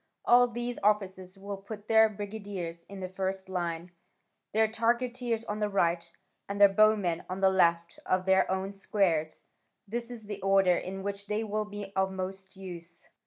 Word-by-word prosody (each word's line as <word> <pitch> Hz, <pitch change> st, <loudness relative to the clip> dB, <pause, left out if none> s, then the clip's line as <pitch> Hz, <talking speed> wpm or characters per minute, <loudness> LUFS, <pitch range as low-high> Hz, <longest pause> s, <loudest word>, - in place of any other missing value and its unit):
All 245 Hz, +1 st, +6 dB
these 240 Hz, +1 st, -4 dB
officers 195 Hz, -2 st, 0 dB
will 200 Hz, +1 st, -6 dB
put 205 Hz, +1 st, -9 dB
their 220 Hz, 0 st, +6 dB
brigadiers 200 Hz, -5 st, -6 dB
in 195 Hz, -1 st, -8 dB
the 185 Hz, -, -3 dB
first 190 Hz, +1 st, -3 dB
line, 175 Hz, -2 st, -3 dB, 0.6 s
their 220 Hz, +1 st, +3 dB
targeteers 235 Hz, +1 st, 0 dB
on 210 Hz, 0 st, -3 dB
the 210 Hz, -1 st, 0 dB
right, 170 Hz, -3 st, +1 dB, 0.4 s
and 200 Hz, 0 st, -3 dB
their 200 Hz, -1 st, +9 dB
bowmen 200 Hz, -4 st, +3 dB
on 185 Hz, +1 st, -4 dB
the 190 Hz, 0 st, +4 dB
left 170 Hz, -2 st, +2 dB
of 185 Hz, 0 st, +1 dB
their 190 Hz, 0 st, +4 dB
own 190 Hz, +1 st, -1 dB
squares: 190 Hz, -6 st, 0 dB, 0.5 s
this 235 Hz, +3 st, -3 dB
is 235 Hz, -3 st, -8 dB
the 205 Hz, 0 st, -6 dB
order 195 Hz, -1 st, +4 dB
in 190 Hz, +2 st, -5 dB
which 200 Hz, 0 st, -4 dB
they 210 Hz, +2 st, -1 dB
will 215 Hz, 0 st, -2 dB
be 205 Hz, -1 st, -8 dB
of 190 Hz, 0 st, +1 dB
most 190 Hz, 0 st, -5 dB
use. 175 Hz, -3 st, -9 dB
195 Hz, 170 wpm, -29 LUFS, 185-215 Hz, 0.6 s, their